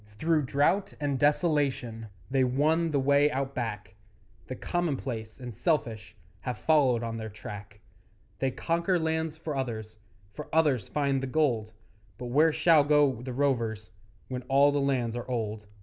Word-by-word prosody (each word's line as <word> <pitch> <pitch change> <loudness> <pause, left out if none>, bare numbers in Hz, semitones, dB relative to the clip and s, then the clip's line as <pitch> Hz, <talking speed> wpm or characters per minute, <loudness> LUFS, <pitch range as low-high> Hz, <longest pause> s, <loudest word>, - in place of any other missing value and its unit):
Through 155 +1 +1
drought 145 +9 +1
and 140 -2 -1
desolation 145 -7 +1 0.2
They 135 -1 +3
won 155 +6 +2
the 145 -3 +1
way 140 +2 +4
Out 140 -2 -3
Back; 105 -7 -4 0.5
The 130 - -5
commonplace 130 -10 -3
and 125 -2 -7
selfish 115 - -1 0.2
Have 125 - -4
followed 135 -7 +3
on 115 -1 -4
their 110 -1 -5
track; 105 0 -10 0.6
They 135 - +1
conquer 170 +7 0
lands 160 -1 -1
for 155 -2 -5
others, 110 -5 -4 0.3
For 150 +5 -7
others 145 -10 +2
find 140 -2 0
the 135 - -3
gold, 125 -7 0 0.4
But 125 -1 -6
where 155 +5 +5
shall 160 -1 +5
go 145 -5 +3
the 130 +1 -6
rovers 115 -7 -1 0.4
When 125 -1 -4
all 140 +1 +5
the 145 0 0
lands 125 -4 0
are 120 +1 -6
old? 110 -3 -3
135 Hz, 155 wpm, -28 LUFS, 115-150 Hz, 0.6 s, where